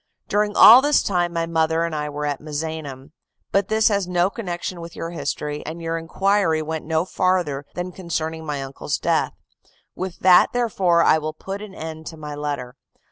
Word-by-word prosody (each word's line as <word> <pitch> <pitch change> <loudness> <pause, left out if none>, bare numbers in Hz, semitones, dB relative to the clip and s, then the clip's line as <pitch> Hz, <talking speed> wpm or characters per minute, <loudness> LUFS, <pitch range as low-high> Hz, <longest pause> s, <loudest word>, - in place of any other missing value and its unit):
During 210 0 0
all 240 +4 +10
this 290 +1 +3
time 175 -3 0
my 165 -1 -1
mother 160 0 +1
and 170 -1 -2
I 150 -1 -2
were 150 0 -4
at 145 -2 -2
Misenum. 150 -2 -6 0.4
But 195 0 +2
this 220 0 +3
has 200 -3 0
no 180 +1 +1
connection 180 -4 -5
with 170 0 -9
your 165 - -5
history, 150 -3 -4
as 160 - -6
your 165 -1 -3
inquiry 165 0 +1
went 160 0 -4
no 160 +1 0
farther 175 -7 0
than 180 +1 -4
concerning 160 -3 -4
my 145 -3 -3
uncle's 135 +1 -4
death; - - 0 0.6
with 185 -1 -5
that, 180 -1 +6
therefore, 190 -8 +2
I 160 - +4
will 155 0 -4
put 195 +5 -7
an 210 -2 -10
end 160 0 -7
to 160 - -8
my 150 -1 -7
letter. 140 -4 -5
165 Hz, 190 wpm, -22 LUFS, 155-185 Hz, 0.6 s, all